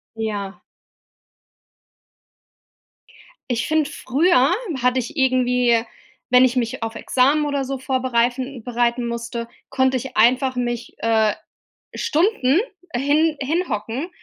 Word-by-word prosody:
Ja. 205 -3 -4 2.9
Ich 235 -1 0
finde, 310 -1 +1
früher 280 +2 +2 0.3
hatte 250 +1 +2
ich 240 +6 -7
irgendwie, 250 -3 +2 0.5
wenn 250 +1 +6
ich 250 0 +2
mich 230 -2 -2
auf 225 0 -5
Examen 280 +6 +2
oder 280 -2 -1
so 270 0 -4
vorbereifen 255 -1 -1
bereiten 240 0 0
musste, 235 0 -5 0.2
konnte 260 -1 +2
ich 260 +2 -6
einfach 255 +4 +3
mich, 240 -1 -3
äh, 220 -2 +2 0.6
Stunden 320 - +2 0.4
hin 295 +4 +2
hinhocken 275 - -2
255 Hz, 105 wpm, -21 LUFS, 235-275 Hz, 2.9 s, wenn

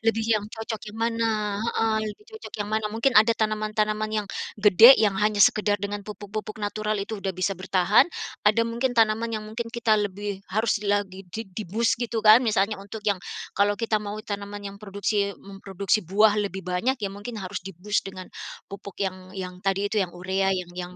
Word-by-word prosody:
Lebih 225 0 +2
yang 205 -1 -1
cocok 220 -1 -5
yang - - -11
mana, 230 0 0 0.3
heeh. 225 -1 0
Lebih 315 - -10
cocok - - -10
yang 205 - -2
mana 220 -1 +1
mungkin 235 +4 +1
ada 220 +2 +7
tanaman-tanaman 215 0 0
yang 210 -2 -1 0.3
gede 210 +5 +9
yang 205 -3 +2
hanya 210 0 +2
sekadar 205 +1 +4
dengan 205 0 -3
pupuk-pupuk 210 +1 -6
natural 215 +1 -1
itu 215 +2 -4
udah 195 -1 -2
bisa 195 +2 0
bertahan, 185 +2 +4 0.4
ada 215 +2 +4
mungkin 240 +2 -1
tanaman 225 +1 +2
yang 215 - -6
mungkin 230 +1 -4
kita 225 -2 +2
lebih 205 0 -4
harus 220 0 +1
lagi 200 -2 -1
di 225 +1 -4
di-boost 215 +4 0
gitu 230 -2 -1
kan 215 +3 +9
misalnya 210 -1 +1
untuk 205 +2 -8
yang 200 - +2 0.4
kalau 205 +1 +3
kita 220 0 0
mau 210 0 -5
tanaman 205 0 -5
yang 200 - -10
produksi 200 0 -1
memproduksi 195 +1 -2
buah 210 +2 +4
lebih 190 -1 -4
banyak 185 +9 0
ya 200 - -1
mungkin 205 +3 -7
harus 185 0 -5
di-boost 195 +3 -2
dengan 185 -1 -8 0.4
pupuk 200 -1 -9
yang 185 -1 -3
yang 180 -1 -5
tadi 195 +1 +1
itu - - -1
yang 175 - -5
urea 190 +2 0
yang 180 -1 -5
yang 180 0 -5
205 Hz, 185 wpm, -25 LUFS, 195-220 Hz, 0.4 s, gede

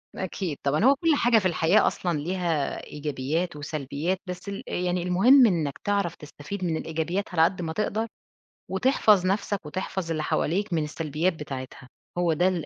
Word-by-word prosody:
أكيد 185 -4 -3
طبعًا، 145 +8 +1
هو 275 +1 +7
كلّ 325 +2 +2
حاجة 240 -4 +4
في 190 - -6
الحياة 175 +4 +3
أصلًا 175 -4 -1
ليها 170 -3 -1
إيجابيات 150 +3 -2
وسلبيات، 150 +4 -3
بس 180 +2 -6
ال 200 +5 -5
يعني 180 0 -1
المهم 235 +9 +6
إنَّك 160 -7 -1
تعرف 200 -4 0
تستفيد 150 +6 -8
من 165 -3 0
الإيجابيات 165 +6 -2
على 160 -1 +4
قد 180 +1 +1
ما 160 -1 -3
تقدر، 215 +3 -1 0.6
وتحفظ 210 -3 +3
نفْسَك، 195 -1 -1
وتحفظ 185 +1 -4
اللي 155 -1 -1
حواليك 185 +6 0
من 160 -2 +1
السلبيات 155 +3 -1
بتاعتها، 130 -4 -8 0.3
هو 175 -2 +2
ده 175 +4 +2
ال 175 -4 -1
175 Hz, 165 wpm, -26 LUFS, 155-195 Hz, 0.6 s, هو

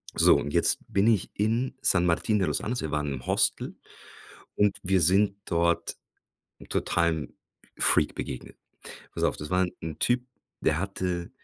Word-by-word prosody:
So, - - +6
und 75 - -4
jetzt - - +3
bin 100 +1 +3
ich 110 -5 +2
in 115 +5 0
San 90 -2 +3
Martín 95 +5 +1
de 95 - +1
los 75 - 0
Andes. 120 +3 -2
Wir 80 - -4
waren 75 -2 -1
im 65 -2 -7
Hostel - - +1 0.8
und 105 -1 +2
wir 95 -1 +2
sind 100 +4 +3
dort 85 0 0 0.6
'n - - -14
totalem 85 -3 0 0.4
Freak - - +2
begegnet. 65 - -6 0.6
Pass - - -2
auf, - - +1
das 75 - -7
war 90 0 +3
'n 90 - -1
'n 80 -1 -5
Typ, 120 0 +1 0.4
der 80 - +1
hatte 90 -2 -3
90 Hz, 170 wpm, -27 LUFS, 80-100 Hz, 0.8 s, So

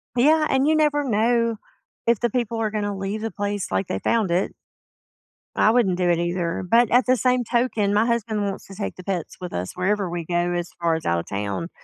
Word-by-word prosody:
Yeah, 305 +5 +4
and 270 +2 +2
you 315 - +4
never 300 -1 +2
know 230 -1 +1 0.5
if 235 -3 +3
the 240 - +1
people 230 -1 -2
are 215 -2 0
gonna 205 -2 -2
leave 195 +3 -3
the 225 - -3
place 205 - -3
like 95 +1 0
they 95 - -2
found 220 -6 +1
it. 180 +3 0 1.0
I 215 - +4
wouldn't 205 -7 +2
do 180 -1 +1
it 170 -1 +2
either, 175 0 -1
but 235 -1 +4
at 245 +1 +4
the 255 - +5
same 250 0 +2
token, 230 -4 0
my 215 +2 +3
husband 225 -3 -1
wants 195 -1 -4
to 195 - -11
take 200 - -4
the 185 - -10
pets 180 -4 -4
with 180 - -5
us 90 +1 -4
wherever 195 0 0
we 170 -1 -4
go 175 +1 0
as 175 -1 -2
far 170 -1 +1
as 160 - -5
out 85 0 +1
of - - -7
town, 105 - -3
205 Hz, 230 wpm, -23 LUFS, 175-235 Hz, 1.0 s, the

